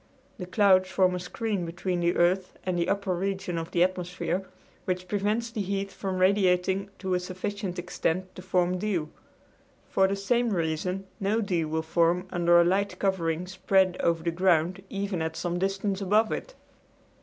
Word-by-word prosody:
The 180 Hz, -, -5 dB
clouds 185 Hz, -1 st, +4 dB
form 185 Hz, -1 st, +3 dB
a 180 Hz, -, -2 dB
screen 200 Hz, +2 st, -3 dB
between 175 Hz, +2 st, -2 dB
the 175 Hz, 0 st, +1 dB
earth 180 Hz, +2 st, +1 dB
and 185 Hz, -1 st, 0 dB
the 175 Hz, 0 st, 0 dB
upper 200 Hz, -2 st, 0 dB
regions 190 Hz, -1 st, -2 dB
of 165 Hz, -, -5 dB
the 175 Hz, -, +3 dB
atmosphere, 180 Hz, +1 st, -2 dB, 0.4 s
which 185 Hz, 0 st, -2 dB
prevents 210 Hz, +4 st, -1 dB
the 225 Hz, -3 st, -3 dB
heat 195 Hz, 0 st, -2 dB
from 190 Hz, -2 st, -4 dB
radiating 190 Hz, 0 st, +2 dB
to 190 Hz, -1 st, -2 dB
a 180 Hz, -, +2 dB
sufficient 185 Hz, +1 st, -4 dB
extent 180 Hz, +1 st, -2 dB
to -, -, -9 dB
form 180 Hz, -1 st, +1 dB
dew. 180 Hz, -7 st, -1 dB, 0.8 s
For 190 Hz, 0 st, +4 dB
the 195 Hz, -, -1 dB
same 235 Hz, +5 st, +1 dB
reason 180 Hz, +1 st, -1 dB
no 205 Hz, +3 st, +1 dB
dew 180 Hz, -7 st, 0 dB
will 160 Hz, +1 st, -1 dB
form 170 Hz, +2 st, +2 dB
under 175 Hz, -1 st, +4 dB
a -, -, +7 dB
light 195 Hz, +3 st, +1 dB
covering 175 Hz, -3 st, 0 dB
spread 185 Hz, 0 st, +2 dB
over 165 Hz, -1 st, +1 dB
the 170 Hz, -, 0 dB
ground 180 Hz, +1 st, +2 dB
even 200 Hz, -3 st, -2 dB
at 160 Hz, 0 st, -2 dB
some 175 Hz, 0 st, -2 dB
distance 195 Hz, +1 st, -1 dB
above 210 Hz, +3 st, +3 dB
it. -, -, -5 dB
185 Hz, 175 wpm, -27 LUFS, 175-195 Hz, 0.8 s, a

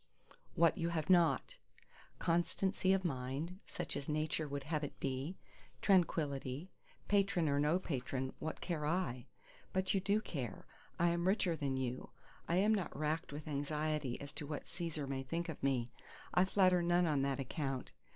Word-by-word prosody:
What 170 Hz, +2 st, +4 dB
you 170 Hz, 0 st, +1 dB
have 165 Hz, 0 st, 0 dB
not: 175 Hz, -, +4 dB, 0.6 s
Constancy 185 Hz, +3 st, +1 dB
of 190 Hz, -1 st, +2 dB
mind, 140 Hz, +5 st, -2 dB
such -, -, -3 dB
as 140 Hz, -, -4 dB
Nature 155 Hz, +1 st, 0 dB
would 140 Hz, -1 st, -4 dB
have 150 Hz, +1 st, -1 dB
it 145 Hz, -, -5 dB
be: 135 Hz, +7 st, -2 dB, 0.4 s
Tranquillity. 155 Hz, -4 st, +1 dB, 0.4 s
Patron 200 Hz, -5 st, +3 dB
or 140 Hz, 0 st, +2 dB
no 150 Hz, +4 st, +3 dB
patron, 130 Hz, -6 st, -3 dB
what 160 Hz, -, -4 dB
care 165 Hz, -4 st, -2 dB
I? 145 Hz, -8 st, -1 dB, 0.5 s
but 190 Hz, 0 st, +1 dB
you 195 Hz, -, +3 dB
do 200 Hz, +3 st, +2 dB
care. 130 Hz, -, -5 dB, 0.3 s
I 175 Hz, 0 st, +4 dB
am 170 Hz, +1 st, +1 dB
richer 190 Hz, -3 st, +3 dB
than 140 Hz, -4 st, -1 dB
you: 130 Hz, -1 st, -3 dB, 0.4 s
I 170 Hz, -, +3 dB
am 205 Hz, +4 st, +4 dB
not 185 Hz, -9 st, -1 dB
racked 155 Hz, +2 st, -1 dB
with 150 Hz, +2 st, -7 dB
anxiety 150 Hz, -2 st, -1 dB
as 140 Hz, 0 st, -8 dB
to 150 Hz, -1 st, -6 dB
what 150 Hz, -1 st, -4 dB
Cæsar 165 Hz, -4 st, -4 dB
may 135 Hz, -1 st, -2 dB
think 165 Hz, +6 st, -3 dB
of 160 Hz, -, -6 dB
me; 125 Hz, -3 st, +1 dB, 0.4 s
I 180 Hz, -, +5 dB
flatter 185 Hz, -2 st, +4 dB
none 175 Hz, +1 st, +3 dB
on 150 Hz, -4 st, +2 dB
that 140 Hz, 0 st, 0 dB
account. 135 Hz, -1 st, -3 dB
155 Hz, 170 wpm, -36 LUFS, 140-175 Hz, 0.6 s, I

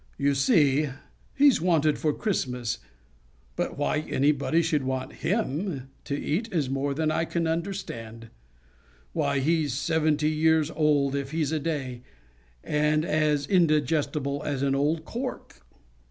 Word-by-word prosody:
You 140 Hz, 0 st, +2 dB
see, 145 Hz, -, +3 dB, 0.5 s
he's 280 Hz, -, +5 dB
wanted 160 Hz, -4 st, +2 dB
for 155 Hz, -, +1 dB
Christmas, 125 Hz, -, -2 dB, 0.8 s
but -, -, -3 dB
why 145 Hz, +1 st, 0 dB
anybody 150 Hz, +2 st, +1 dB
should 150 Hz, -2 st, +1 dB
want 130 Hz, 0 st, -3 dB
him 165 Hz, -, -2 dB
to 140 Hz, -, -2 dB
eat 215 Hz, +10 st, -2 dB
is 150 Hz, -7 st, 0 dB
more 140 Hz, +1 st, -1 dB
than 155 Hz, +1 st, +1 dB
I 160 Hz, -, +1 dB
can 170 Hz, +1 st, -1 dB
understand. 120 Hz, -, -4 dB, 0.8 s
Why, -, -, 0 dB
he's 150 Hz, -1 st, +1 dB
seventy 155 Hz, +1 st, +1 dB
years 160 Hz, 0 st, +2 dB
old 145 Hz, -3 st, +2 dB
if 140 Hz, -1 st, -3 dB
he's 155 Hz, -1 st, -1 dB
a 160 Hz, -, 0 dB
day, 140 Hz, -6 st, -3 dB, 0.6 s
and 150 Hz, +1 st, +1 dB
as 150 Hz, -3 st, +1 dB
indigestible 150 Hz, -4 st, +1 dB
as 140 Hz, -3 st, -2 dB
an 135 Hz, -1 st, +2 dB
old 155 Hz, +4 st, 0 dB
cork." 255 Hz, +2 st, -6 dB
150 Hz, 135 wpm, -26 LUFS, 140-160 Hz, 0.8 s, he's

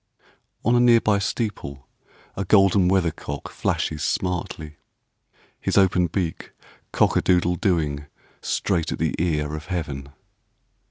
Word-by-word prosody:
On 120 Hz, +2 st, +4 dB
a -, -, +5 dB
near 120 Hz, -1 st, +6 dB
by 105 Hz, -2 st, +2 dB
steeple, 100 Hz, -, -4 dB, 0.5 s
A 100 Hz, -, -2 dB
golden 95 Hz, -1 st, +4 dB
weather 90 Hz, -3 st, +2 dB
cock 70 Hz, -2 st, -7 dB
flashes 75 Hz, -2 st, -2 dB
smartly, 85 Hz, -4 st, -3 dB, 0.8 s
His -, -, -1 dB
open 95 Hz, -2 st, +4 dB
beak 85 Hz, -1 st, -4 dB, 0.4 s
"Cock -, -, +2 dB
a -, -, +3 dB
doodle 90 Hz, -1 st, +2 dB
dooing" 75 Hz, -7 st, 0 dB, 0.3 s
Straight 85 Hz, -4 st, -1 dB
at -, -, -2 dB
the -, -, 0 dB
ear 75 Hz, -3 st, 0 dB
of 75 Hz, +3 st, -8 dB
Heaven. 75 Hz, -7 st, -4 dB
90 Hz, 130 wpm, -23 LUFS, 75-95 Hz, 0.8 s, near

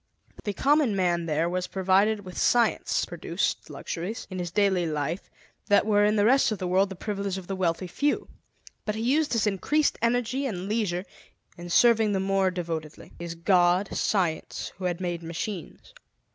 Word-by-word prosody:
The 205 Hz, -, -1 dB
common 280 Hz, -1 st, +2 dB
man 175 Hz, -3 st, +1 dB
there 160 Hz, +1 st, +1 dB
was 180 Hz, +1 st, -2 dB
provided 195 Hz, +2 st, +2 dB
with 185 Hz, -, -9 dB
science 235 Hz, -2 st, +2 dB
produced -, -, -3 dB
luxuries, 185 Hz, +7 st, -5 dB
in 185 Hz, -, -4 dB
his 175 Hz, -1 st, -3 dB
daily 190 Hz, -2 st, +2 dB
life, 155 Hz, +3 st, -3 dB, 0.4 s
that 205 Hz, -, +4 dB
were 205 Hz, -1 st, +3 dB
in 210 Hz, +1 st, +2 dB
the 205 Hz, -1 st, +3 dB
rest 265 Hz, +1 st, +4 dB
of 215 Hz, -, -1 dB
the 185 Hz, -, -4 dB
world 190 Hz, +2 st, +3 dB
the 190 Hz, -, -7 dB
privilege 200 Hz, 0 st, -3 dB
of 190 Hz, -, -7 dB
the 195 Hz, -, -4 dB
wealthy 180 Hz, -1 st, 0 dB
few 285 Hz, +11 st, -1 dB, 0.6 s
but 210 Hz, -, -2 dB
he 220 Hz, -, -3 dB
used 290 Hz, +5 st, +2 dB
his 225 Hz, -2 st, +2 dB
increased 285 Hz, +10 st, +1 dB
energy 245 Hz, +3 st, 0 dB
and 190 Hz, -5 st, -4 dB
leisure 200 Hz, -4 st, -1 dB, 0.5 s
in 175 Hz, 0 st, -9 dB
serving 225 Hz, +2 st, +4 dB
the 190 Hz, -, +1 dB
more 195 Hz, 0 st, +2 dB
devotedly, 165 Hz, -4 st, -5 dB
his 170 Hz, -1 st, -5 dB
God, 180 Hz, +2 st, +2 dB
Science, 175 Hz, -6 st, -1 dB
who 185 Hz, -, -5 dB
had 175 Hz, -1 st, -1 dB
made 175 Hz, -2 st, -2 dB
machines. 170 Hz, +2 st, -6 dB
190 Hz, 175 wpm, -26 LUFS, 175-215 Hz, 0.6 s, that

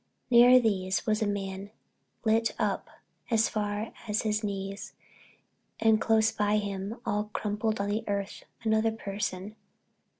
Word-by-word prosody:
Near 245 Hz, +1 st, +8 dB
these 195 Hz, -4 st, 0 dB
was 215 Hz, -2 st, +1 dB
a 215 Hz, -, +2 dB
man, 195 Hz, -1 st, -4 dB, 0.6 s
lit 225 Hz, +1 st, +2 dB
up -, -, -1 dB, 0.4 s
as 225 Hz, -2 st, +3 dB
far 210 Hz, +1 st, -3 dB
as 210 Hz, 0 st, 0 dB
his 215 Hz, 0 st, 0 dB
knees, 200 Hz, +1 st, -4 dB, 0.9 s
and 220 Hz, -1 st, +4 dB
close 220 Hz, 0 st, +3 dB
by 210 Hz, 0 st, +1 dB
him, 200 Hz, +2 st, -4 dB
all 210 Hz, +1 st, 0 dB
crumpled 215 Hz, +1 st, -1 dB
on 200 Hz, 0 st, -1 dB
the 210 Hz, +2 st, -1 dB
earth, 200 Hz, -1 st, -3 dB, 0.2 s
another 220 Hz, 0 st, +3 dB
person. 200 Hz, -1 st, -4 dB
210 Hz, 135 wpm, -29 LUFS, 200-220 Hz, 0.9 s, Near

